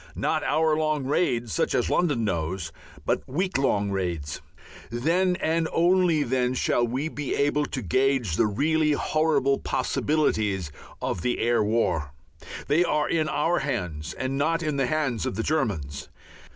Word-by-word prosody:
Not - - 0
hour 155 0 +2
long 155 -2 0
raids 120 - 0
such - - 0
as - - +1
London 145 -10 +1
knows, 85 -2 -2 0.3
but - - +1
week 180 +3 -1
long 105 -7 +1
raids. 85 -7 -3 0.5
Then 170 +10 +1
and 165 -1 0
then - - -10
only 155 -8 +2
shall 120 -1 +1
we 130 +6 -2
be 150 -3 -3
able 145 +1 +1
to 130 - -4
gauge 125 - +1
the 110 - +3
really 150 +7 +1
horrible 145 -3 +1
possibilities 105 - 0 0.3
of 90 - -2
the 125 - 0
air 120 -1 +2
war. 95 -9 0 0.5
They 155 +5 +3
are 150 -3 +1
in 155 -2 0
our 165 +4 +1
hands 90 - -3
and 135 +1 -2
not 165 +3 +1
in 150 -3 -1
the 135 -2 +1
hands 145 -7 -1
of - - -3
the 115 - -2
Germans. 85 - -2
135 Hz, 155 wpm, -26 LUFS, 105-155 Hz, 0.5 s, the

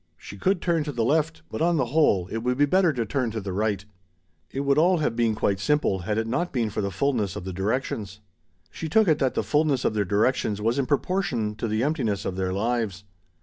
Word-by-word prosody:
She 100 - -10
could 180 - 0
turn 170 -3 +1
to 150 - -3
the 120 -4 -1
left, 155 +4 0
but, - - -4
on 170 0 +3
the 130 - +2
whole, 105 - +3
it 115 - -2
would 125 +2 -1
be 145 - +5
better 180 +3 +3
to 120 -5 -2
turn 125 +1 -1
to 110 0 -4
the 95 -2 -5
right 105 0 -1 0.6
It 135 - -3
would 140 +1 +2
all 180 +3 +4
have 150 -7 -1
been 115 -2 +1
quite 100 -2 0
simple 150 -4 +1
had 105 +4 -2
it 110 - 0
not 170 +10 -1
been 115 -5 -1
for - - -2
the 100 - -1
fullness 110 -5 -1
of - - -5
the 95 0 -5
directions. 105 0 -2 0.5
She 160 - -5
took 220 +5 +4
it 155 -3 +3
that 130 -2 +1
the - - 0
fullness 150 -3 +1
of - - +2
their 105 -1 +1
directions 105 +2 +1
was 115 +5 0
in 135 - 0
proportion 140 - 0
to 105 - -4
the 110 +2 0
emptiness 120 -10 -1
of 95 - -2
their 95 -1 -1
lives. 105 -1 -1
120 Hz, 240 wpm, -25 LUFS, 105-150 Hz, 0.6 s, be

